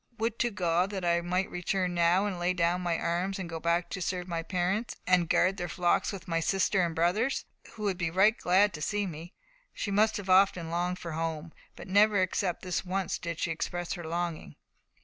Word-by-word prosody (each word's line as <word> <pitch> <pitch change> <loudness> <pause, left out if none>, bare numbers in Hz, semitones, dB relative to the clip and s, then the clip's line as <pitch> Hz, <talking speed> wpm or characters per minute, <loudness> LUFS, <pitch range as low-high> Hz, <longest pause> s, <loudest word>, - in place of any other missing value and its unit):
Would 230 +1 -2
to 240 - +2
God 180 -3 +1
that 190 -3 -4
I 170 0 +2
might 180 +2 -1
return 180 +1 -1
now, 175 +3 +3
and 195 -4 -3
lay 175 +1 +1
down 175 0 +1
my 170 -2 0
arms, 180 +3 -1
and 185 -3 -5
go 165 -1 -5
back 170 +1 +1
to 190 - -4
serve 180 0 -2
my 170 -2 -2
parents, 185 +6 -1
and 180 -2 +3
guard 190 +2 +3
their 175 -2 -4
flocks 175 +1 +1
with 195 -2 -8
my 165 -1 0
sister 190 +2 +1
and 170 -2 -2
brothers, 200 +11 +1 0.3
who 215 - -8
would 195 -3 -1
be 170 -2 0
right 190 +6 +4
glad 190 +1 +3
to 150 - -7
see 205 +5 -1
me." 170 0 -8 0.4
She 200 - -3
must 215 +2 +2
often 185 -1 +4
have 165 - -6
longed 175 +1 -1
for 170 -2 -7
her 160 - -4
home, 165 0 -3 0.2
but - - -10
never 205 +2 +4
except 185 -1 -1
this 180 -2 -2
once 190 0 -2
did 170 -2 -4
she 165 - -1
express 175 +2 -3
her 175 - -6
longing. 170 0 -4
180 Hz, 220 wpm, -29 LUFS, 170-195 Hz, 0.4 s, right